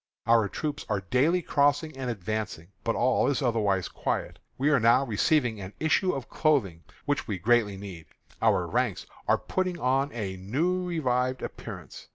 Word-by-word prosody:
Our 115 -3 +4
troops 150 -2 -4
are 100 -2 0
daily 165 +8 +3
crossing 145 +2 +2
and 130 -2 -4
advancing, 105 -5 -4
but 115 - 0
all 130 +2 +2
is 140 0 0
otherwise 105 -6 +1
quiet. - - -3 0.2
We 140 +3 +2
are 140 - +4
now 120 +4 +4
receiving 120 -1 +1
an 95 +1 -8
issue 170 +4 +2
of 135 -3 -5
clothing, 120 - +1 0.2
which 145 0 -1
we 100 -4 -2
greatly 105 +1 +2
need. 95 -5 -9 0.3
Our - - +3
ranks - - -1 0.2
are - - +4
putting 185 -2 -2
on 135 +3 +1
a 100 -5 -4
new 155 - 0
revived 130 -6 0
appearance. - - -8
125 Hz, 165 wpm, -27 LUFS, 105-145 Hz, 0.3 s, Our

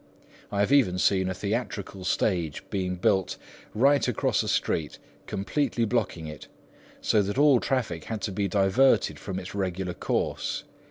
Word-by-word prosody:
I 100 -1 0
have 105 - +1
even 125 -11 +4
seen 95 0 +2
a - - -1
theatrical 100 -2 -3
stage 85 -6 0
built 95 0 0 0.4
right 140 +5 +4
across 125 - +1
a - - -4
street, 75 -2 -1 0.3
completely 120 +3 -1
blocking 105 -8 -1
it, 75 -2 -9 0.5
so 105 - +3
that 100 +3 -3
all 145 -3 +6
traffic 115 - -2
had 110 -1 -4
to 105 - -1
be 100 +1 -1
diverted 100 +7 +3
from 95 -2 -5
its 95 - -8
regular 95 -2 -2
course. - - -2
100 Hz, 150 wpm, -27 LUFS, 90-115 Hz, 0.5 s, all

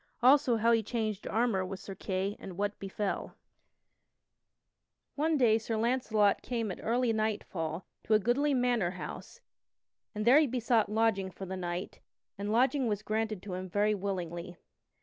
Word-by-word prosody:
Also 260 -2 +5
How 230 +2 +3
He 225 -1 +4
Changed 215 -2 -3
Armor 225 -4 +1
with 185 0 -6
Sir 195 - -8
Kay 190 +1 -2
and 180 -2 -9
what 205 +1 -2
Befell._ 195 +1 -3 1.8
One 310 +2 +1
day 225 -4 +4
Sir 225 0 -3
Launcelot 220 -3 +2
came 230 -4 -2
at - - -7
early 235 +1 +1
nightfall 190 -6 -2 0.2
to 220 - +4
a - - +5
goodly 270 +7 +2
manor 245 -7 +2
house 475 - -8 0.7
and 210 0 -2
there 255 +5 +7
he 310 - +3
besought 235 -3 +1
lodging 215 -3 +1
for 190 +1 -8
the 190 0 -5
night, 175 0 -4 0.4
and 205 +1 -3
lodging 260 +3 +2
was 210 -1 -1
granted 215 -2 -2
to 195 -2 -6
him 185 +1 -5
very 205 +3 +2
willingly. 180 -3 -4
215 Hz, 160 wpm, -31 LUFS, 195-235 Hz, 1.8 s, there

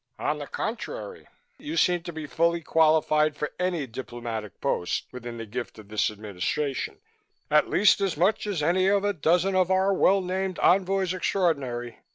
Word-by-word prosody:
"On - - -1
the - - -6
contrary, 475 -2 -5 0.3
you 305 +2 -5
seem 175 -1 +3
to 175 0 -7
be 160 -2 -6
fully 170 +3 +1
qualified 155 -1 +3
for 150 - -3
any 180 -5 0
diplomatic 115 -4 -6
post 90 - -1
within 120 -1 -7
the 115 - -6
gift 120 +3 -6
of 105 -2 -13
this 110 0 +1
Administration, 110 +7 -3 0.5
at 150 0 +4
least 205 0 +4
as 195 -6 0
much 200 +6 +1
as 185 -7 -1
any 185 +4 +3
of 200 0 +3
a 205 0 +1
dozen 175 +3 +2
of 185 -1 +2
our 190 +1 +3
well 195 +1 +4
named 185 0 -2
envoys 190 0 +2
extraordinary. 135 - -1
165 Hz, 170 wpm, -26 LUFS, 125-190 Hz, 0.5 s, at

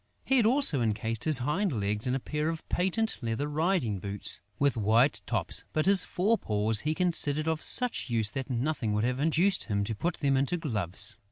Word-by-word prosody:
He 265 - +3
had 230 -3 +4
also 245 - +4
encased 110 0 -1
his 155 -3 +3
hind 150 - -1
legs 105 +3 -1
in 125 - 0
a - - -1
pair 150 +4 -3
of 165 -1 -6
patent 190 +5 -1
leather 115 +5 -2
riding 150 - -1
boots, 100 +1 -2 0.2
with 140 -1 +1
white 110 +2 +2
tops; - - +1
but 155 - 0
his 195 0 +5
fore 205 +5 0
paws 105 0 0
he 155 +5 -2
considered 155 -4 0
of 160 -1 -1
such 250 - +1
use 110 -3 +1
that 135 -1 -5
nothing 125 -3 -2
would 105 +1 0
have 125 +2 -1
induced 165 +6 +1
him 100 -3 -1
to 110 +3 -3
put 170 - -2
them 140 -2 0
into 140 +6 0
gloves. 105 - -1
140 Hz, 200 wpm, -28 LUFS, 110-165 Hz, 0.2 s, his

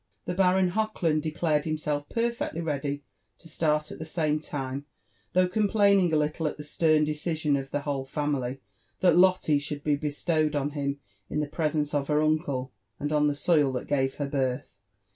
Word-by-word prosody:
The 180 - -2
Baron 185 0 +3
Hochland 180 -7 0
declared 155 -1 0
himself 150 -2 -2
perfectly 235 -7 -1
ready 145 -3 -2 0.3
to - - -16
start 150 -1 0
at - - -8
the - - -4
same 155 -1 0
time, 140 -2 -5 0.5
though 185 0 +4
complaining 200 -2 +3
a - - +2
little 150 +1 0
at - - -4
the 150 - -7
stern 155 +1 +2
decision 150 0 0
of 135 -1 -3
the 145 - -2
whole 140 -2 -2
family, 135 -2 -2 0.4
that 180 -3 +5
Lotte 180 -5 +4
should 145 0 -5
be 150 -1 +2
bestowed 155 +1 0
on 145 0 0
him 140 -1 -2 0.3
in 150 - -1
the 150 - +1
presence 150 -1 -1
of 140 -1 0
her 150 0 +2
uncle, 145 -5 0 0.3
and 145 +1 -2
on 150 0 +3
the 145 - 0
soil 145 -2 +3
that 125 - -3
gave 135 -2 +1
her 145 - -2
birth. 130 -3 -2
150 Hz, 180 wpm, -27 LUFS, 145-165 Hz, 0.5 s, that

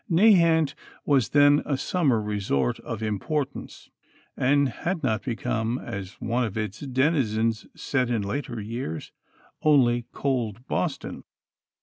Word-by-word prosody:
Nahant 170 -5 +5 0.3
was 135 -8 +3
then 145 0 +5
a 140 - -1
summer 140 -8 +1
resort 100 -12 -1
of 110 -1 -6
importance, 135 +7 -3 0.4
and 140 +2 +3
had 170 +7 -3
not 110 -5 +1
become, 115 0 -2
as 100 -5 -6
one 120 +2 -1
of 110 -3 -3
its 110 -1 -3
denizens 125 -5 0
said 130 -3 -1
in 115 -4 0
later 115 +3 -3
years, 105 -6 -5 0.5
only 120 -6 +3
"cold 120 -4 -2
Boston." 150 -6 -3
125 Hz, 120 wpm, -26 LUFS, 110-145 Hz, 0.5 s, Nahant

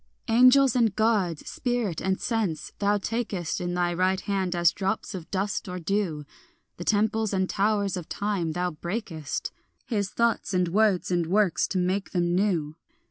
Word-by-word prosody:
Angels 255 +2 +6
and 225 -5 +2
Gods, 205 -8 +1
spirit 240 -9 -2
and 190 +1 0
sense, 215 -10 -2
thou 205 0 +2
takest 205 -5 -3
In 175 0 -2
thy 175 -1 +1
right 185 +2 +1
hand 190 -3 -1
as 175 -1 +4
drops 195 +2 -2
of 180 -4 -7
dust 195 0 -2
or 180 - -4
dew; 175 -4 -1 0.5
The 175 - -5
temples 215 +1 +1
and 190 -1 +2
the 185 - -3
towers 200 -1 +1
of 180 -3 -6
time 200 -6 -1
thou 180 +1 -1
breakest, 170 -2 -4 0.3
His 205 -5 -1
thoughts 235 -4 0
and 180 -1 +2
words 200 -1 +2
and 175 -2 +1
works, 195 -1 +2
to 190 - -2
make 185 +2 -1
them 175 -1 +1
new. 175 -5 0
190 Hz, 170 wpm, -26 LUFS, 175-210 Hz, 0.5 s, Angels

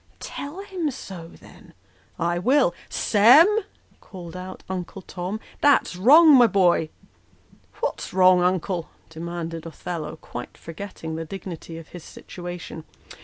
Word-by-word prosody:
" - - -38 0.2
Tell 295 +7 -6
him 375 -6 -3
so, 190 -10 -8
then." - - -17 0.2
" - - -34
I 175 - -1
will. 255 -1 +3 0.2
Sem! 235 +10 +6 0.4
" - - -34
called 175 -3 -10
out 185 +1 -8
Uncle 185 0 -6
Tom, 185 +5 -5
" - - -25
that's 285 -9 +3
wrong, 295 - +7
my 245 -3 +7
boy." 180 -5 +2 0.4
" - - -28
What's - - -3
wrong, 185 -1 +5
Uncle? 180 -1 -1
" - - -34
demanded 165 0 -6
Othello, 160 -1 -6
quite 120 -5 -9
forgetting 165 -2 -7
the 165 - -4
dignity 170 -2 -8
of 165 - -11
his 175 -3 -10
situation. 175 -2 -9
180 Hz, 150 wpm, -24 LUFS, 165-210 Hz, 0.4 s, wrong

